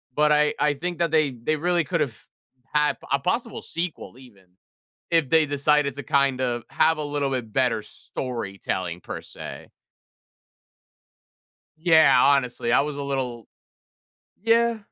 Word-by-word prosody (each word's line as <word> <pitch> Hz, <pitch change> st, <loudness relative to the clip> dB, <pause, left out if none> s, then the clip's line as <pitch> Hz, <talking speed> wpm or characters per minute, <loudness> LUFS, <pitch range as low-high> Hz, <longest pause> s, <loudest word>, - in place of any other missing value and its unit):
But 150 Hz, 0 st, +3 dB
I 150 Hz, 0 st, +3 dB
I 150 Hz, -1 st, +2 dB
think 175 Hz, +4 st, -4 dB
that 170 Hz, -2 st, +2 dB
they 155 Hz, -3 st, +3 dB
they 125 Hz, +6 st, -1 dB
really 175 Hz, +2 st, +1 dB
could've 150 Hz, -8 st, -2 dB, 0.5 s
had 150 Hz, 0 st, +1 dB
a 140 Hz, -, +3 dB
possible 230 Hz, -, -2 dB
sequel 170 Hz, -7 st, -5 dB
even, 110 Hz, -8 st, -17 dB, 0.7 s
if 165 Hz, -5 st, +2 dB
they 160 Hz, -1 st, +4 dB
decided 145 Hz, 0 st, +1 dB
to, 145 Hz, -, -6 dB
kind 140 Hz, -3 st, +1 dB
of, 120 Hz, -2 st, -1 dB
have 160 Hz, -1 st, +3 dB
a 150 Hz, -, -3 dB
little 145 Hz, -1 st, -1 dB
bit 120 Hz, -4 st, -3 dB
better 125 Hz, -5 st, +1 dB
storytelling 100 Hz, -9 st, -5 dB
per -, -, -7 dB
se. -, -, -9 dB, 2.1 s
Yeah, 160 Hz, -6 st, +5 dB
honestly, 125 Hz, -4 st, +2 dB
I -, -, +5 dB
was 145 Hz, 0 st, -3 dB
a 140 Hz, -, -4 dB
little 130 Hz, -5 st, -4 dB, 0.9 s
Yeah. 230 Hz, 0 st, +3 dB
145 Hz, 140 wpm, -24 LUFS, 125-155 Hz, 2.1 s, Yeah